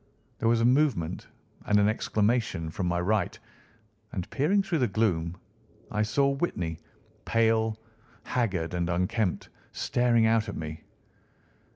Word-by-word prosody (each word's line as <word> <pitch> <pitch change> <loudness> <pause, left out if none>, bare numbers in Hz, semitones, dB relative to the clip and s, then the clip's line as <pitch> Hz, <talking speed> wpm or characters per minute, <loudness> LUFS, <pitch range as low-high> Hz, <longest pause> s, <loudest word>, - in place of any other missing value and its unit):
There 115 - +2
was 115 0 +3
a - - +3
movement 125 - +1 0.4
and 105 0 +4
an 105 - +4
exclamation 110 -6 0
from 90 +1 -2
my 85 0 0
right, 100 +1 0 0.8
and 90 -3 -3
peering 185 +9 +2
through 175 -5 -1
the 125 - +3
gloom, 90 -5 0 0.5
I 105 - 0
saw 140 +6 +2
Whitney, 95 - -2 0.4
pale, 110 -1 +2 0.5
haggard, 95 -9 -1
and 90 0 -1
unkempt, 90 +3 -1 0.2
staring 120 -2 +2
out 110 -1 +2
at - - -5
me. 80 0 -6
110 Hz, 135 wpm, -28 LUFS, 90-120 Hz, 0.8 s, and